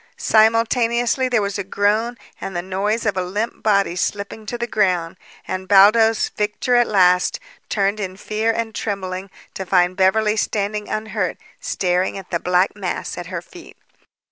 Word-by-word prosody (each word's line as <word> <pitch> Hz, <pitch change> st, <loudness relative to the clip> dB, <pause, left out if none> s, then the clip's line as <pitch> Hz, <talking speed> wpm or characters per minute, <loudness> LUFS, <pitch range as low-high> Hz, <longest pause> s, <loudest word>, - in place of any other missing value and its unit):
Simultaneously, 230 Hz, +3 st, +2 dB
there 240 Hz, -4 st, +2 dB
was 200 Hz, 0 st, -3 dB
a -, -, -2 dB
groan 210 Hz, +5 st, 0 dB, 0.2 s
and 190 Hz, -, -5 dB
the 175 Hz, -, -2 dB
noise 200 Hz, +5 st, -1 dB
of 205 Hz, -, +1 dB
a 185 Hz, -, -1 dB
limp 205 Hz, +6 st, -3 dB
body 200 Hz, -4 st, +2 dB
slipping 200 Hz, +3 st, -3 dB
to 240 Hz, -, -3 dB
the 235 Hz, -, -2 dB
ground, 185 Hz, -6 st, 0 dB, 0.3 s
and, 185 Hz, 0 st, -4 dB
Baldos, 215 Hz, +3 st, +5 dB
victor 210 Hz, +4 st, -2 dB
at 240 Hz, -1 st, +4 dB
last, 180 Hz, -3 st, +3 dB, 0.3 s
turned 200 Hz, 0 st, 0 dB
in 190 Hz, -2 st, -5 dB
fear 215 Hz, +2 st, -2 dB
and 225 Hz, -1 st, -3 dB
trembling 190 Hz, -3 st, -4 dB, 0.2 s
to 190 Hz, -, -5 dB
find 180 Hz, -1 st, +2 dB
Beverly 210 Hz, +3 st, +2 dB
standing 210 Hz, 0 st, -2 dB
unhurt 215 Hz, 0 st, -2 dB, 0.2 s
staring 180 Hz, +1 st, -1 dB
at 195 Hz, -1 st, -10 dB
the 170 Hz, -, 0 dB
black 180 Hz, +3 st, +1 dB
mass 195 Hz, -4 st, -4 dB
at 175 Hz, -1 st, -7 dB
her 180 Hz, -2 st, -5 dB
feet. 345 Hz, -, -14 dB
205 Hz, 165 wpm, -20 LUFS, 185-220 Hz, 0.3 s, Baldos